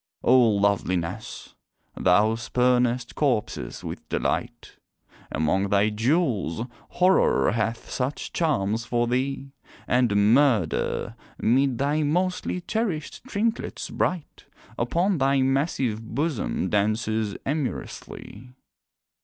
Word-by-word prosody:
O 125 - +5
Loveliness! 100 -3 0 0.4
thou 105 +5 +3
spurnest 125 +1 +1
corpses 130 -8 -1
with - - -7
delight, - - -3 0.5
Among 95 +6 0
thy 100 +1 +3
jewels, 115 - 0 0.2
Horror 185 +1 +3
hath 115 +1 -2
such 130 +3 -3
charms 115 - 0
for 120 0 0
thee, 135 +3 -2 0.4
And 110 -4 +3
Murder 115 - +1 0.2
'mid 130 +2 +2
thy 145 +4 +1
mostly 180 +4 -1
cherished 180 -6 -3
trinklets 225 -1 -2
bright, 180 -5 -2 0.3
Upon 170 +9 0
thy 135 0 +3
massive 135 -4 0
bosom 135 - -2
dances 110 0 0
amorously. 125 -4 -5
125 Hz, 95 wpm, -25 LUFS, 110-145 Hz, 0.5 s, O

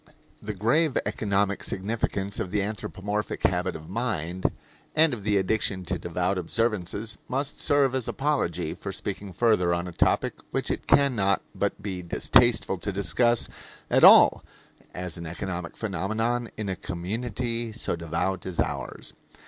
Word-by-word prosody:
The 105 0 -5
grave 130 - +2
economic 100 -1 0
significance 100 -1 -2
of 95 - -2
the 100 +1 0
anthropomorphic 105 0 -4
habit 90 0 +1
of 80 0 -9
mind 95 -4 -3 0.5
and 155 -2 +5
of 110 -5 -5
the 105 0 +2
addiction 95 -1 0
to - - -2
devout 90 +2 -1
observances 105 +2 -1
must 135 +2 -2
serve 140 -3 +3
as 130 -3 -1
apology 140 - -1
for - - -6
speaking 100 -1 -4
further 90 -4 +3
on 85 +1 -3
a - - -6
topic - - +2 0.2
which - - -2
it - - -4
can 140 -2 +4
not 100 -2 +2
but - - -2
be 95 -3 -4
distasteful 105 +3 +3
to 100 +4 -3
discuss 100 +5 +2 0.4
at - - +4
all - - +8 0.5
as 90 -2 -5
an 85 -1 -6
economic 90 +1 -5
phenomenon 110 +4 -1
in 105 -2 -3
a 95 - -1
community 115 +6 -3
so 110 -5 -2
devout 85 +3 -2
as 90 -3 -6
ours. - - -3
100 Hz, 150 wpm, -26 LUFS, 90-115 Hz, 0.5 s, all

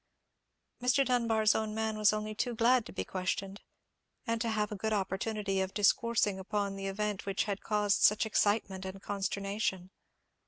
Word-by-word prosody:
Mr. 250 +2 +3
Dunbar's 230 -4 +3
own 215 -1 -2
man 220 0 -1
was 215 -1 +4
only 215 0 -3
too 240 +3 -2
glad 235 +1 +3
to - - -9
be - - -4
questioned, 195 +1 -3 0.6
and 230 -2 -1
to 235 - 0
have 215 -1 -1
a - - -3
good 220 +2 -2
opportunity 195 0 -1
of 190 0 -3
discoursing 205 -1 +2
upon 200 0 -2
the 195 0 -4
event 205 0 -3
which 195 -1 0
had 200 -2 -3
caused 210 -1 +1
such 210 +2 +5
excitement 205 -3 +1
and 190 +1 -6
consternation. 195 -1 -2
210 Hz, 165 wpm, -31 LUFS, 195-220 Hz, 0.6 s, such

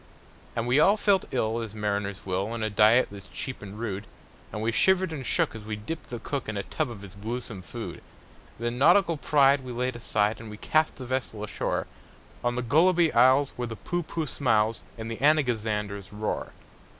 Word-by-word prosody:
And 115 - -1
we 125 +4 +3
all 200 +7 +5
felt 200 -3 +3
ill 115 -2 0
as 110 -2 -6
mariners 100 -2 -2
will, 95 +1 -1
On 115 -1 -3
a 110 - -1
diet 110 +5 +5
that's 100 -2 -10
cheap 130 - -6
and 100 0 -9
rude; 110 -2 -4 0.4
And 105 - -4
we 115 - +1
shivered 185 - +3
and 140 -4 -5
shook - - +1
as 110 -1 -8
we 105 0 -4
dipped 110 +11 -6
the 120 - -4
cook 130 +1 -4
In 105 - -3
a 100 - -2
tub 155 +5 -2
of 105 -4 -9
his 95 -2 -10
gluesome 110 -1 -5
food. 85 - -7 0.6
Then 120 +1 -3
nautical 170 +4 +5
pride 140 -1 +4
we 130 - -7
laid 125 +1 -2
aside, 105 -2 0
And 115 - -9
we 105 - -8
cast 155 +7 +1
the 130 - -8
vessel 125 -4 -3
ashore 105 - -2 0.6
On 120 0 +1
the 125 - -1
Gulliby 165 +6 +4
Isles, 130 +4 +5
where 120 -1 -2
the 115 - -6
Poohpooh 170 -2 -3
smiles, 115 -5 +1 0.2
And 115 0 -5
the 115 - -4
Anagazanders 110 -9 +1
roar. 105 +1 -3
120 Hz, 200 wpm, -27 LUFS, 105-140 Hz, 0.6 s, all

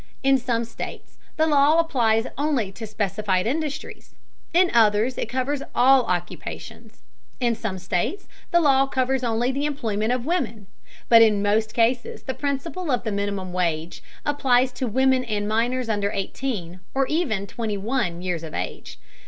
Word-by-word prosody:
In 270 0 +4
some 235 -2 -1
states 230 - -8 0.2
the 315 - +4
law 295 0 +4
applies 235 -8 +2
only 275 -9 0
to 220 +3 -8
specified 205 -2 -1
industries; 295 +4 -4 0.4
in 355 +1 +4
others 225 +2 +4
it - - -3
covers 260 +3 -1
all 260 0 +5
occupations. 175 -1 -5 0.4
In 240 -2 +2
some 220 -4 -4
states 185 - -2 0.2
the 345 - +4
law 275 -4 +4
covers 260 0 0
only 240 +2 +1
the 280 +2 -1
employment 225 -6 -1
of 250 -1 -1
women, 235 - -2 0.4
but 230 -1 +8
in 210 -2 +4
most 215 +1 +1
cases 235 +1 +1
the 260 - -3
principle 295 +6 -3
of 250 -3 +1
the 220 - -2
minimum 200 -2 -3
wage 170 -2 -2 0.2
applies 260 -3 +2
to 250 +1 -3
women 260 +3 +2
and 210 -3 -2
minors 240 +3 0
under 205 -2 0
eighteen, 195 -3 -4 0.2
or 270 0 +3
even 260 - -1
twenty 215 -1 -3
one 200 -5 -2
years 180 -3 -2
of 160 -2 -7
age. - - -5
235 Hz, 160 wpm, -24 LUFS, 205-270 Hz, 0.4 s, but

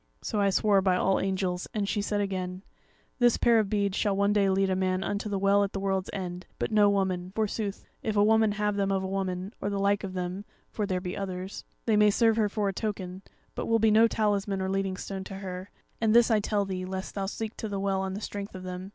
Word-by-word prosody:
So 210 -3 -1
I 200 - +4
swore 200 0 +3
by 185 -1 +3
All 190 +1 +2
Angels; 185 -2 -1
and 205 -2 0
she 205 - 0
said 205 0 -1
again: 185 -1 -3 0.6
'This 240 -1 +4
pair 235 -1 +4
of 210 -3 0
beads 200 -2 0
shall 205 -2 +1
one 200 +1 +3
day 200 -2 +3
lead 190 0 +2
a - - +2
man 185 0 0
unto 205 +2 -2
the 200 - -1
Well 200 +1 +4
at 200 - -3
the 195 - -2
World's 195 -1 -1
End, 180 -2 -5
but - - -2
no 210 -1 +5
woman; 185 -2 0
forsooth, 210 -2 -2 0.2
if 215 -1 -2
a 205 - +6
woman 220 0 +4
have 210 0 0
them 195 -1 +1
of 190 -1 0
a - - -2
woman, 190 +1 -3
or 200 - -1
the 200 - -2
like 200 +1 +1
of 190 -1 -5
them, 180 +2 -3 0.3
(for 210 -2 -2
there 185 -2 -1
be 180 -1 -4
others,) 190 0 -5 0.2
they 220 -2 +3
may 210 0 +6
serve 225 +2 +3
her 215 -2 +2
for 205 -1 -1
a 195 - -1
token; 190 -3 -4 0.3
but - - -4
will 230 - +4
be 220 -1 +4
no 220 +2 +6
talisman 205 -3 0
or 190 0 -1
leading 195 -1 -1
stone 190 0 -5
to 195 - -7
her; 190 0 -6 0.3
and 220 0 +3
this 235 0 +6
I 220 - +4
tell 205 0 0
thee 185 -1 -4
lest 190 +1 -5
thou 195 -1 -2
seek 220 +2 -4
to 220 - -4
the 200 -1 -3
Well 195 -1 0
on 190 0 -3
the 205 - -5
strength 200 -1 -6
of 185 - -7
them. 185 +1 -6
195 Hz, 255 wpm, -28 LUFS, 190-210 Hz, 0.6 s, a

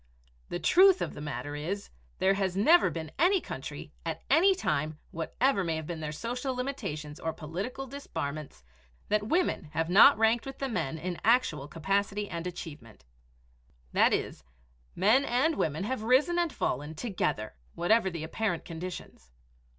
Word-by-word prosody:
The - - -2
truth 380 - +6
of - - -3
the - - -8
matter 145 0 -5
is, 180 +7 -4 0.3
there 195 - +3
has 195 -2 -1
never 320 - +6
been 160 -2 -6
any 370 +4 +4
country, - - -7
at - - -4
any 380 +4 +6
time, 155 - -1
whatever 195 +6 0
may 165 -2 -1
have 160 -1 -4
been 170 0 -5
their 155 -1 -4
social 245 - -3
limitations 195 - -4
or 160 - -2
political 195 - -5
disbarments, 155 - -6 0.5
that 210 0 +1
women 340 - +1
have 165 +2 -1
not 225 +9 +8
ranked 225 +3 +2
with 270 - -7
the 270 - -3
men 160 - -2
in 175 +2 -5
actual 215 - +2
capacity 200 +6 -1
and 170 -1 -4
achievement; 145 - -9 0.9
that - - +5
is, - - -2 0.5
men 215 +9 +4
and 280 +5 +1
women 155 - -1
have 240 +2 -2
risen 265 +10 +3
and 340 -2 +1
fallen 150 - -2
together, 150 - -2 0.2
whatever 205 +2 +3
the 170 -3 -5
apparent 175 +1 -2
conditions. 170 - -8
195 Hz, 160 wpm, -29 LUFS, 160-250 Hz, 0.9 s, not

